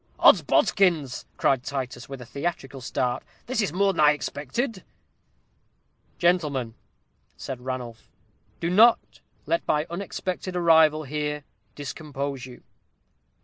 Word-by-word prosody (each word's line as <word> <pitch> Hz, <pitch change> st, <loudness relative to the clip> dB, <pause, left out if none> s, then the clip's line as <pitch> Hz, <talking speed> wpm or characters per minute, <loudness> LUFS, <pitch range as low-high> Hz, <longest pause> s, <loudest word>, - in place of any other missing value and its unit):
"Odsbodikins!" 165 Hz, -10 st, +4 dB
cried 135 Hz, -2 st, +2 dB
Titus, 130 Hz, -3 st, -5 dB
with 135 Hz, -2 st, -7 dB
a -, -, -8 dB
theatrical 140 Hz, -1 st, -4 dB
start; 125 Hz, 0 st, -1 dB, 0.2 s
"this 240 Hz, -2 st, 0 dB
is 200 Hz, -, 0 dB
more 195 Hz, +3 st, +2 dB
than 165 Hz, -, -6 dB
I 150 Hz, 0 st, +7 dB
expected." 185 Hz, -, -3 dB, 1.3 s
"Gentlemen," 150 Hz, -10 st, +1 dB, 0.6 s
said 130 Hz, -2 st, -6 dB
Ranulph, 125 Hz, -3 st, -6 dB, 0.5 s
"do 170 Hz, -, -1 dB
not 225 Hz, +5 st, +4 dB, 0.3 s
let 335 Hz, -, +1 dB
my 150 Hz, 0 st, +2 dB
unexpected 185 Hz, 0 st, -4 dB
arrival 160 Hz, -3 st, +5 dB
here 150 Hz, 0 st, -3 dB, 0.3 s
discompose 140 Hz, -2 st, -5 dB
you. 125 Hz, -, -10 dB
Dr. -, -, -21 dB
150 Hz, 115 wpm, -25 LUFS, 130-175 Hz, 1.3 s, I